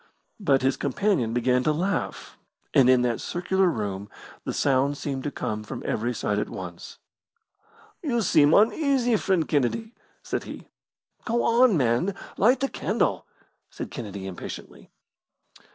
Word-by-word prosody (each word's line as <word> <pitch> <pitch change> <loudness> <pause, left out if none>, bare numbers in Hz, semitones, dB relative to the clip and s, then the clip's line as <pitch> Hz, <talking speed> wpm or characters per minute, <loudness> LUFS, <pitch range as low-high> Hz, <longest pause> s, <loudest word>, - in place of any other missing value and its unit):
But 140 -10 +2
his 135 +1 +2
companion 140 - 0
began 125 +1 +2
to 155 - +2
laugh, 175 +4 -2 0.4
and 130 -2 +6
in 125 -1 +5
that 120 -2 0
circular 190 +2 0
room 100 - -3 0.4
the - - -2
sound 140 +1 +1
seemed 135 -2 -4
to - - 0
come 110 -4 -4
from 105 - -7
every 120 +3 -1
side 105 -3 -1
at - - -3
once. 85 -2 -8 1.0
"You 240 -8 0
seem 150 -5 +5
uneasy, 245 - +3
friend 190 -6 +1
Kennedy," 155 - 0 0.3
said - - -3
he. - - -9 0.5
"Go 235 +1 0
on, 235 -4 +4
man, 130 +9 +1 0.2
light 245 +7 +3
the 275 - +2
candle!" - - -1 0.4
said - - -7
Kennedy, 100 -6 -6
impatiently. 95 -2 -8
140 Hz, 140 wpm, -25 LUFS, 120-200 Hz, 1.0 s, and